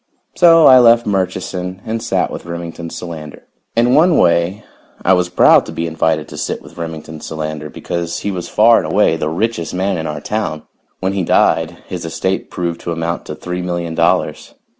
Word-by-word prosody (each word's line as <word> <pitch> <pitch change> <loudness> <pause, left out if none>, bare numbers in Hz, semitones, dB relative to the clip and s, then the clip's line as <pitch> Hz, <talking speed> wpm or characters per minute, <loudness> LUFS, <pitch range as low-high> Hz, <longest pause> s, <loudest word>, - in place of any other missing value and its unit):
So 165 -2 +6
I 130 -1 +9
left 120 -1 +5
Murchison 95 -1 -2
and 115 0 -3
sat 115 - -1
with - - -8
Remington 85 0 -6
Solander. 80 -3 -8 0.3
In 120 +2 +3
one 165 +4 +5
way 85 +4 +2 0.4
I 95 - +5
was 90 -1 +1
proud 90 - +5
to - - -6
be 85 - -3
invited 80 -1 0
to - - -8
sit - - -3
with - - -14
Remington 80 -2 -7
Solander, 75 -1 -5
because 85 +1 -4
he 100 - -3
was 90 -2 -5
far 115 +2 +5
and - - -4
away - - +3
the 75 -1 -2
richest 90 0 -2
man 95 -1 -1
in 80 - -3
our 75 -1 -4
town. 80 -2 -3 0.4
When 95 +1 0
he 95 -2 -1
died, 80 0 +1
his 90 -2 -6
estate 95 +3 -2
proved 85 -1 -4
to 85 - -4
amount 85 +1 -3
to 75 - -5
three 90 +3 -5
million 85 -2 -3
dollars. - - 0
85 Hz, 190 wpm, -17 LUFS, 80-100 Hz, 0.4 s, I